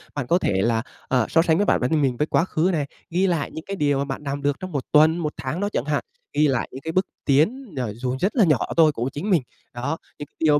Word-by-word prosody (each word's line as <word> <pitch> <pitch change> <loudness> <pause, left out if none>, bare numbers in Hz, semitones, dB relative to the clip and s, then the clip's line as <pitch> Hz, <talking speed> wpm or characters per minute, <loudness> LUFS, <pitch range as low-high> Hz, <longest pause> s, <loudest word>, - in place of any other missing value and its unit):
Bạn 145 -4 -3
có 170 - +4
thể 95 - +1
là, 115 +1 +2 0.3
ờ, 125 -4 +2
so 165 - +4
sánh 165 -1 +2
với 205 - +2
bản - - +2
thân 150 +5 +2
mình 130 -3 +1
với 150 - 0
quá 165 - +2
khứ 175 -1 +1
này, 150 -3 0 0.2
ghi 180 +3 +2
lại 165 -5 -1
những 160 - -7
cái 195 - -4
điều 145 -5 +1
mà 140 - 0
bạn 135 +1 -5
làm 140 0 -3
được 145 0 0
trong 185 0 -6
1 140 -4 -3
tuần, 155 +2 +5
1 155 -3 -2
tháng 135 +6 -3
đó 205 +1 0
chẳng 120 - -1
hạn, 150 -1 0 0.3
ghi 150 0 +4
lại 130 -3 0
những 130 - -8
cái 160 - -4
bước 185 +2 +2 0.2
tiến, 190 - +1
ờ, 120 -5 -2
dù 125 +3 -3
rất 195 +7 0
là 235 - +5
nhỏ 155 -5 +4 0.2
thôi 160 -2 +6
của 125 -2 -2
chính 180 +9 -4
mình. 180 -6 +4 0.3
Đó, 140 +6 -3 0.2
những 145 - -5
cái - - -45
điều 155 -2 +4
150 Hz, 290 wpm, -23 LUFS, 135-170 Hz, 0.3 s, thôi